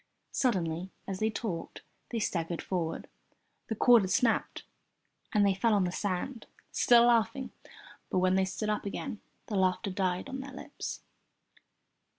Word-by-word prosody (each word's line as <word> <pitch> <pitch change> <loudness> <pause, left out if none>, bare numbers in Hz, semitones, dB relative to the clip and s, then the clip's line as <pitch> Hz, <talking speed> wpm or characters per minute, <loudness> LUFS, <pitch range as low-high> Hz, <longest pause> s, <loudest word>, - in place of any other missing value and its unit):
Suddenly, 180 -7 0 0.2
as 190 -1 -4
they 220 - +2
talked, 205 -6 -5 0.3
they 235 - -3
staggered 170 -5 -2
forward. 170 -4 -2 0.6
The 220 - -2
cord 240 +1 +6
had 190 - -2
snapped 240 +2 +1 0.7
and 210 -2 +4
they 200 - +4
fell 215 +3 +2
on 200 - +3
the 180 - 0
sand, 205 +6 -3 0.2
still 240 -1 +6
laughing, 235 +2 +2 0.6
but - - 0
when 185 0 +3
they 190 0 +3
stood 195 +3 -3
up 210 - -1
again 220 +2 -5 0.2
the 210 - -4
laughter 190 +1 +1
died 185 +1 -1
on 270 -1 -5
their 270 0 -7
lips. 265 - -6
200 Hz, 155 wpm, -30 LUFS, 185-235 Hz, 0.7 s, cord